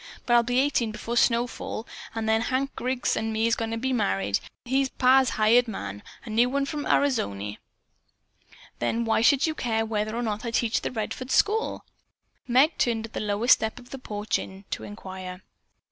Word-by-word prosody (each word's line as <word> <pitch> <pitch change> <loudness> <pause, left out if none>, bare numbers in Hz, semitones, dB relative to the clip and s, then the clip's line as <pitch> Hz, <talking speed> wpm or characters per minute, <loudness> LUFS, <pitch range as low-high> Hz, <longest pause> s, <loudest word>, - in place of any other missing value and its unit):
But 240 - +1
I'll 240 - +7
be 245 +1 -1
eighteen 260 -5 +1
before 230 +2 -5
snowfall, 235 -1 0 0.3
an' 225 -1 -2
then 220 0 +2
Hank 265 +3 -1
Griggs 255 +1 -1
an' 225 0 -2
me's 225 +1 +2
goin' 225 -1 -3
to 225 - -2
be 260 +3 -1
married. 95 - +1 0.3
He's 265 +2 +1
pa's 260 0 +4
hired 230 +3 +5
man. 100 - -5 0.2
A 225 - -7
new 235 +3 +3
one 280 +1 0
from 290 0 -4
Arizony." 105 - 0 1.2
"Then 230 - 0
why 225 0 +2
should 275 +3 +4
you 315 - 0
care 225 -6 -1
whether 215 0 -2
or 240 - -2
not 215 -1 -2
I 235 - -2
teach 230 0 +1
the - - -2
Redford 250 +2 -4
school?" 430 +9 +1 0.6
Meg 265 +6 +3
turned 225 -2 +1
at 230 - -13
the - - -3
lowest 210 +4 +4
step 220 0 -1
of 245 0 -13
the 270 - -5
inn - - -27
porch 210 -1 -2 0.3
to - - -3
inquire. 185 -2 -8
230 Hz, 190 wpm, -26 LUFS, 215-255 Hz, 1.2 s, I'll